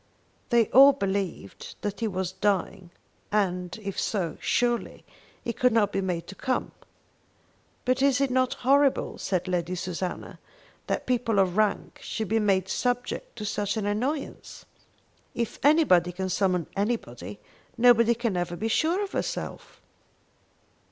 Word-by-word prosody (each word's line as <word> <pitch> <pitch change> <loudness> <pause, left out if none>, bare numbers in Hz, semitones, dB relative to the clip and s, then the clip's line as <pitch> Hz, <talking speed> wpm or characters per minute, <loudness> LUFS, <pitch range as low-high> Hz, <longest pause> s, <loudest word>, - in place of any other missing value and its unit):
They 235 -1 +4
all 275 +2 +8
believed 195 - -4
that 205 -1 -4
he 230 - 0
was 185 -2 -2
dying, 190 -1 -1 0.4
and, 180 -3 0
if 195 -1 -4
so, 180 -7 -1
surely 240 -1 0 0.4
he 235 - -2
could 250 +2 +2
not 215 -3 +2
be 195 - -1
made 180 -3 -2
to - - -9
come. 255 +5 -2 1.1
"But 255 +1 +1
is 275 -2 +3
it 275 -2 +1
not 255 0 +1
horrible," 275 +1 +3
said 185 -1 -1
Lady 180 0 -1
Susanna, 180 0 -5 0.5
"that - - -2
people 240 -4 0
of 185 -2 +2
rank 215 -1 0
should 220 -3 -4
be 225 +1 +2
made 195 -3 +2
subject 245 - -2
to 210 - -6
such 205 +1 -2
an 210 - -2
annoyance! 255 +9 -3 0.7
If 235 -2 -3
anybody 275 - +4
can 185 +1 -4
summon 185 -3 +1
anybody, 125 - -3 0.4
nobody 235 -1 +5
can 230 -4 -1
ever 175 0 -2
be 220 +5 -2
sure 335 - +1
of 395 - -6
herself!" - - -5
205 Hz, 145 wpm, -26 LUFS, 185-245 Hz, 1.1 s, all